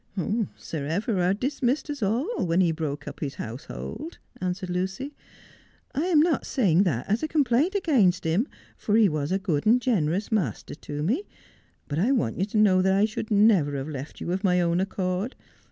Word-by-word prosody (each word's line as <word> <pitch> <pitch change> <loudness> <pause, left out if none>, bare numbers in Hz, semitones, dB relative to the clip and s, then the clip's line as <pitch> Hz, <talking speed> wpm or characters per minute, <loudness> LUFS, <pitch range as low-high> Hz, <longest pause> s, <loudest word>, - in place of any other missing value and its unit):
' 220 -2 -1
Sir 145 -4 -5
Everard 185 +2 0
dismissed 270 +2 0
us 285 -3 -6
all 250 - 0
when 165 +2 +2
he 175 -3 +4
broke 150 -2 -4
up - - -7
his 140 -3 -4
house 120 +6 -7
hold,' 320 +3 -7 0.2
answered 185 0 -3
Lucy. 190 +11 -3 0.4
' - - -27 0.3
I 300 +6 0
am 335 -5 +4
not 320 -2 +2
saying 190 -9 +2
that 130 -9 -1
as 210 +3 +1
a 310 - -1
complaint 300 - +2
against 245 - +3
him, 175 - +1 0.3
for 210 - -1
he 220 -2 +6
was 150 -3 -2
a 190 - +2
good 175 -4 -1
and 235 +3 +6
generous 200 -6 0
master 180 - -1
to 145 0 -6
me, 260 - 0 0.6
but 145 +1 -2
I 225 +9 +2
want 120 - 0
you 190 - +2
to 215 +1 -3
know 195 -3 +5
that 190 +1 +3
I 200 +2 +4
should 215 0 -4
never 200 -9 +4
have 135 +1 -4
left 140 0 -7
you 170 - -3
of 190 +3 -2
my 180 -2 +3
own 170 +1 +2
accord. 190 +4 -2
190 Hz, 200 wpm, -26 LUFS, 165-235 Hz, 0.6 s, he